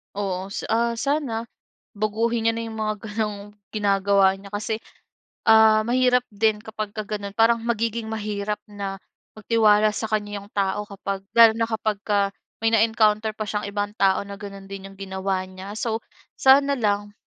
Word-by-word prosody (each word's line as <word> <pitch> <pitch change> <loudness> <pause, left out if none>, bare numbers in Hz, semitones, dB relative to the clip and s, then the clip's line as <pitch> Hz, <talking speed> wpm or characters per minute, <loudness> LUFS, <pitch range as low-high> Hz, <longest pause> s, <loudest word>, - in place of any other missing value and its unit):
Oo, 195 -1 -3
sa, - - -4
ah, 235 +1 +1
sana 270 -6 -1 0.5
baguhin 225 +2 0
niya - - +5
na 230 - -3
'yong 220 - -7
mga 215 -1 -1
gano'ng 210 -1 -3 0.3
ginagawa 195 -2 +3
niya 195 0 -13
kasi, 215 +2 -2 0.7
ah, 220 -1 +6
mahirap 250 +1 +3
din 215 0 +1
kapagka 215 -1 -5
gano'n. 205 -1 -5
Parang 230 +1 +4
magiging 230 -1 -1
mahirap 210 -1 -3
na 195 -2 -6 0.3
magtiwala 215 -1 +3
sa 220 +1 -3
kaniya 205 -1 -2
'yong 200 +1 -13
tao 200 +1 0
kapag 195 -1 -5
lalo 230 -1 +8
na 230 - +2
kapagka 210 -2 0 0.3
may 225 - +3
na-encounter 220 -1 +3
pa 220 - -4
siyang 210 0 -2
ibang 205 0 -2
tao 195 0 +3
na 200 0 -9
gano'n 195 -1 -9
din 195 0 -7
'yong 195 0 -14
ginawa 190 -1 -2
niya. 185 +2 -9
So 225 0 -1 0.4
sana 275 +1 +5
lang 205 -2 -1
210 Hz, 160 wpm, -24 LUFS, 200-225 Hz, 0.7 s, lalo